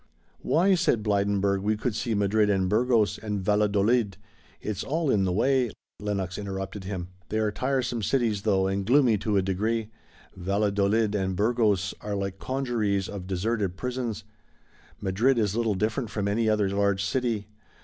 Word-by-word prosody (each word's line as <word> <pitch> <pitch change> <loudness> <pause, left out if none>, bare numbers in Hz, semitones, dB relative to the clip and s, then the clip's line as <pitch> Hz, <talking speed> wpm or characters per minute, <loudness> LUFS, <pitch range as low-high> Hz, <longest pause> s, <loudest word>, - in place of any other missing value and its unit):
"Why," 185 +5 +3
said 170 - +2
Blydenburg, 100 -1 +1
"we 105 +2 0
could 120 +1 -1
see 115 +1 -1
Madrid 105 +1 +2
and 95 -2 +2
Burgos 110 +1 +2
and 105 -2 -3
Valladolid. 105 +1 +2 0.4
It's 105 -2 -4
all 155 0 0
in 95 -2 +2
the 90 - 0
way." 125 +5 +2 0.3
Lenox 100 -3 -3
interrupted 95 0 -5
him. 90 -2 -4 0.2
"They 110 - -1
are 110 -1 +1
tiresome 130 -1 -1
cities 110 -3 +1
though, 95 -3 +2
and 95 +1 -1
gloomy 120 -1 +4
to 105 0 0
a 95 - +2
degree. 110 +4 -1 0.4
Valladolid 100 +3 +1
and 95 -2 -1
Burgos 105 -2 +1
are 105 -1 -3
like 95 -1 -3
congeries 115 -7 -1
of 95 -3 -7
deserted 95 0 -1
prisons, 125 -3 -3 0.8
Madrid 110 +7 +2
is 105 -3 +1
little 115 -3 +1
different 110 +4 -1
from 100 -2 -2
any 110 +2 +1
other 105 -2 +2
large 100 0 +1
city. 115 -3 -1
105 Hz, 160 wpm, -27 LUFS, 100-115 Hz, 0.8 s, gloomy